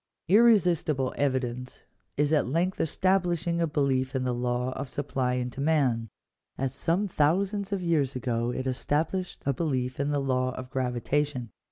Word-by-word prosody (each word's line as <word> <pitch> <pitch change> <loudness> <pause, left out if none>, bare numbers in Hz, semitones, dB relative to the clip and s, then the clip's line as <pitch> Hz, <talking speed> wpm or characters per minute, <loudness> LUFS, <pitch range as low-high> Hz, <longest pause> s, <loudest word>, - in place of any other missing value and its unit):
Irresistible 175 - +4
evidence 130 -2 -2 0.3
is 145 +2 +2
at 150 -5 +3
length 170 +7 0
establishing 175 -1 +1
a 165 - +2
belief 135 -3 0
in 130 - 0
the 125 -1 0
law 125 +1 -1
of 135 +1 -5
supply 130 -3 -1
and 125 0 -2
demand, 135 -5 +1 0.5
as 135 -1 -2
some 170 +8 0
thousands 195 +5 +1
of 195 -2 -1
years 150 -6 +1
ago 120 -1 -1
it 130 +1 -3
esta 145 +4 0
blished 185 -1 -4
a 140 - +2
belief 130 -4 -2
in 140 +1 0
the 145 - +1
law 130 -1 0
of 130 0 -8
gravitation. 130 0 -1
140 Hz, 160 wpm, -28 LUFS, 130-165 Hz, 0.5 s, Irresistible